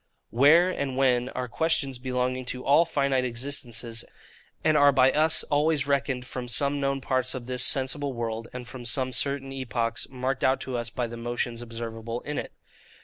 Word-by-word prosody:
WHERE 160 +9 +5
and 135 -6 -3
WHEN 125 -2 +2
are 125 0 -3
questions 140 -1 0
belonging 130 0 -2
to 125 +1 -4
all 155 +5 +5
finite 140 -5 0
existences, 120 -2 -3 0.6
and 155 -1 +3
are 145 -1 +6
by 130 -1 +4
us 155 +2 +4
always 145 -1 +1
reckoned 135 -3 -1
from 125 -1 -5
some 140 +5 +2
known 135 -1 -1
parts 130 -1 -1
of 125 -2 -6
this 125 0 +1
sensible 135 +2 +2
world, 115 -1 -4
and 125 -1 -8
from 125 0 -9
some 130 +1 +1
certain 140 0 0
epochs 120 -3 -3
marked 130 0 -3
out 130 +1 +3
to 130 - -5
us 120 -1 -2
by 125 - -3
the 120 0 -7
motions 120 0 -3
observable 115 0 -6
in 150 0 -4
it. - - -6
130 Hz, 180 wpm, -26 LUFS, 120-140 Hz, 0.6 s, are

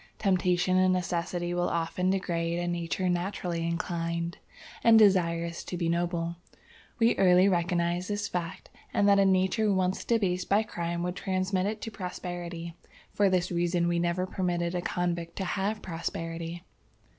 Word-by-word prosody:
"Temptation 185 -2 +2
and 185 0 +4
necessity 175 -1 -1
will 175 0 0
often 170 +2 -1
degrade 170 -3 -1
a 175 0 -2
nature 175 +1 -1
naturally 175 -1 -1
inclined 170 0 -2 0.4
and 230 -1 +7
desirous 170 -5 +3
to 180 - -4
be 170 -1 0
noble. 170 0 -1 0.6
We 230 0 +3
early 185 0 +5
recognized 175 0 0
this 205 0 -1
fact, 180 0 -5 0.2
and 205 - +4
that 200 0 +6
a 195 - +5
nature 190 +3 +2
once 185 -1 0
debased 185 -6 0
by 205 +2 +4
crime 170 -4 -3
would 180 0 -2
transmit 185 0 -1
it 215 +1 -3
to 225 - -5
posterity. 175 -3 -6 0.4
For 205 -1 +3
this 185 -1 +1
reason 175 0 +1
we 170 0 +1
never 175 +1 0
permitted 175 -2 -1
a 180 - -1
convict 175 -1 -2
to 190 - -3
have 205 +3 -2
posterity." 165 0 -5
180 Hz, 155 wpm, -28 LUFS, 170-190 Hz, 0.6 s, and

